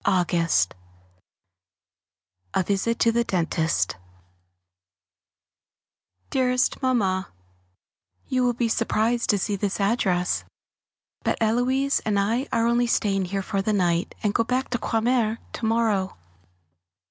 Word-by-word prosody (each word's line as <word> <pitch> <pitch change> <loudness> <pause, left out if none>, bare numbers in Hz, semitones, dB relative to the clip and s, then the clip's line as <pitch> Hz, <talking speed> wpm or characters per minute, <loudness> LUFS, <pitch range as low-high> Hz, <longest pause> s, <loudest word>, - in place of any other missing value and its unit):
[Sidenote: 170 - +2 1.8
A - - +3
Visit 205 +5 0
to 230 - +3
the 235 +1 +1
Dentist] 165 - 0 2.3
Dearest 250 0 +1
Mamma, 200 -8 +1 1.0
You 255 -1 +1
will 245 -1 +2
be 235 0 0
surprised 230 +1 0
to 205 - +4
see 200 +2 -1
this 200 0 -2
address, 195 -4 +1 0.8
but - - 0
Héloise 250 +5 +1
and 210 -2 +1
I 230 +7 0
are 230 0 +2
only 240 +1 +2
staying 195 -4 +1
here 195 +2 -3
for 195 +1 -1
the 215 +2 0
night, 175 -2 0
and 205 -1 +1
go 230 - +2
back 255 +3 -2
to 245 - 0
Croixmare 225 -1 +1 0.2
to 230 - -4
morrow. 220 -4 +1
220 Hz, 120 wpm, -24 LUFS, 190-240 Hz, 2.3 s, to